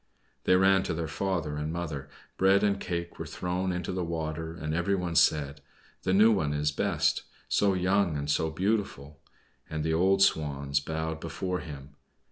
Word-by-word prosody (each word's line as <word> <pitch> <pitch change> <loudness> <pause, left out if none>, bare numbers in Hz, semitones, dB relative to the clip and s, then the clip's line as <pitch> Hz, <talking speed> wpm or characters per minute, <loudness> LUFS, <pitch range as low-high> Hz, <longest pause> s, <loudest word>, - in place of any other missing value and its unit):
They 90 - +5
ran 95 +1 +5
to 80 - 0
their 80 0 -2
father 80 -3 -2
and 75 +1 -3
mother, 80 -5 -4 0.3
bread 95 +1 +4
and 100 -1 +2
cake 85 -1 -4
were - - -4
thrown 90 +1 -2
into 90 0 -3
the 90 -1 -2
water, 80 0 -4
and 75 -1 -4
every 90 +4 +1
one 90 -2 -2
said: 75 -2 +3 0.4
"The - - -1
new 105 +4 +6
one 75 -8 +1
is 75 0 +1
best, 70 - +1 0.3
so 100 -2 +2
young 90 -2 +2
and 70 0 -4
so 80 +2 +1
beautiful!" 80 -6 -2 0.5
And 80 -1 -3
the 80 +1 0
old 95 +4 +4
Swans 70 -4 +1
bowed 80 +2 -3
before 90 +2 -3
him. 70 -2 -10
80 Hz, 175 wpm, -28 LUFS, 75-95 Hz, 0.5 s, new